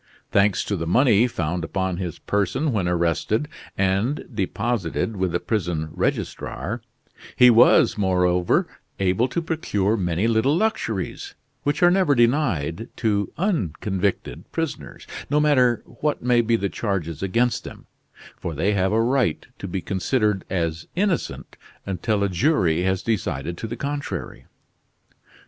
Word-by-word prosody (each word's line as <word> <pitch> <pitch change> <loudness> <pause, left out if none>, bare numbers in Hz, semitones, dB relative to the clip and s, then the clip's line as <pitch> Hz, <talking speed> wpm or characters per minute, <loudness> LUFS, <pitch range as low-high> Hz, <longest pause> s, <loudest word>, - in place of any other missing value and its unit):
Thanks 100 -1 +3
to 100 - -2
the 85 -3 -3
money 120 - +4
found 85 -5 -2
upon 95 +2 -2
his 90 -4 -4
person 105 - 0
when 100 -6 0
arrested, 90 - 0 0.3
and 100 +9 0
deposited 105 0 -1
with 95 -2 -1
the 90 - 0
prison 85 -8 -2
registrar, 120 +6 -3 0.5
he 125 -1 +7
was, 115 -2 +5
moreover, 90 -2 +2 0.3
able 95 +6 +2
to 170 +6 -3
procure 110 - 0
many 90 -1 0
little 115 +7 +2
luxuries, 115 - -2 0.3
which 145 +4 0
are 175 - +7
never 185 -6 +3
denied 115 - +1
to 100 -4 0
unconvicted 100 - -2
prisoners, 165 -3 -4 0.2
no 150 - +3
matter 130 -6 +3
what 145 +3 -3
may 120 -1 +4
be 115 0 +2
the 100 -3 0
charges 90 -7 -3
against 115 +6 +1
them, - - -10 0.5
for 85 - -5
they 95 +8 +1
have 95 -1 +1
a 110 - +2
right 125 - +1
to 100 - -5
be 95 +1 -3
considered 105 +1 0
as 85 -3 -2
innocent 190 -1 -2 0.3
until 100 +2 -1
a - - +3
jury 90 - +2
has 95 +1 0
decided 85 -7 -2
to 115 - -5
the 120 +2 -6
contrary. 140 - -5
105 Hz, 140 wpm, -23 LUFS, 90-125 Hz, 0.5 s, he